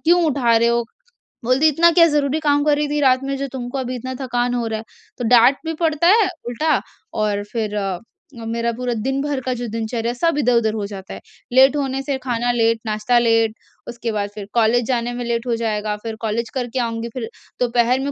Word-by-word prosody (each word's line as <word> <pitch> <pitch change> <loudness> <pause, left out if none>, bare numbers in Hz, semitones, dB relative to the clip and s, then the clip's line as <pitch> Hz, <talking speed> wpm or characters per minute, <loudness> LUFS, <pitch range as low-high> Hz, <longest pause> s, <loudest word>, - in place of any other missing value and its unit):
क्यों 345 +2 +4
उठा 250 -6 +2
रहे 235 +1 +3
हो? 235 0 +2 0.6
बोलती 255 +5 +3
है, - - +4
"इतना 340 +4 +5
क्या 335 0 +6
ज़रूरी 295 -1 +1
काम 290 -1 +2
कर 300 -1 +4
रही 295 0 0
थी 295 0 0
रात 260 -1 +3
में, 275 0 -2
जो 275 - -3
तुमको 245 0 -5
अभी 255 -1 -3
इतना 255 +1 -5
थकान 245 -1 -1
हो 235 -1 -1
रहा 220 -1 -3
है?" - - -8 0.4
तो - - -2
डाँट 250 +3 +6
भी 325 - -2
पड़ता 320 +1 +2
है 420 +1 +5 0.2
उल्टा, 305 +6 +1 0.3
और 210 -1 -1
फिर 215 -3 -2
अ, 195 -3 -2 0.5
मेरा 230 +1 -1
पूरा 245 +1 -2
दिन 265 +5 -2
भर 290 -1 -2
का 255 - 0
जो 240 - -3
दिनचर्या 225 +1 -3
है, - - -7
सब 330 +4 +1
इधर-उधर 235 -5 +2
हो 210 -2 -2
जाता 195 -2 -8
है। - - -10 0.3
लेट 265 +2 +6
होने 270 -1 -1
से 275 -1 -2
खाना 245 -1 0
लेट, 230 -1 +2
नाश्ता 215 +3 +1
लेट, 225 -2 +2 0.3
उसके 235 -1 -4
बाद 205 -1 -2
फिर 210 -2 -6
कॉलेज 235 +1 +3
जाने 245 -1 -1
में 245 0 -4
लेट 235 +1 -2
हो 235 - +1
जाएगा। 210 -2 -1
फिर 225 -1 -4
कॉलेज 225 +1 -2
करके 255 0 -2
आऊँगी, 230 -1 -2
फिर 235 -4 -5 0.3
दोपहर 245 +1 +2
में 280 +1 -2
245 Hz, 225 wpm, -20 LUFS, 230-270 Hz, 0.6 s, क्या